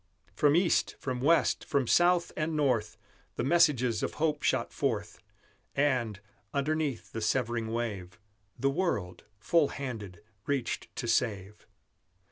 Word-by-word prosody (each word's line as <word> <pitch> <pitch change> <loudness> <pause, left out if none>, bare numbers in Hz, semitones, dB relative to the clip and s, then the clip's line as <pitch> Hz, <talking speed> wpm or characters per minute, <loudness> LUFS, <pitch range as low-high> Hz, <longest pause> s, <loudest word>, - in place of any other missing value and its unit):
From 145 0 +3
East, 175 0 +2
from 125 -2 -4
West, 165 +5 +3
from 140 -3 0
South 175 +6 +3
and 155 +1 -1
North, 125 -7 +1 0.4
The - - -2
messages 130 -7 +3
of - - -3
hope 150 -1 0
shot - - 0
forth, 110 -7 -2 0.6
And, 125 -8 +1 0.4
underneath 140 - -1
the 115 - -5
severing 120 -1 0
wave, 105 -6 -4 0.4
The 135 0 +1
world, 135 - -2
full 150 +9 +3
handed, 105 -9 -6 0.2
reached 140 -4 -2
to 120 - -4
save. 105 -4 -1
130 Hz, 125 wpm, -30 LUFS, 110-150 Hz, 0.6 s, From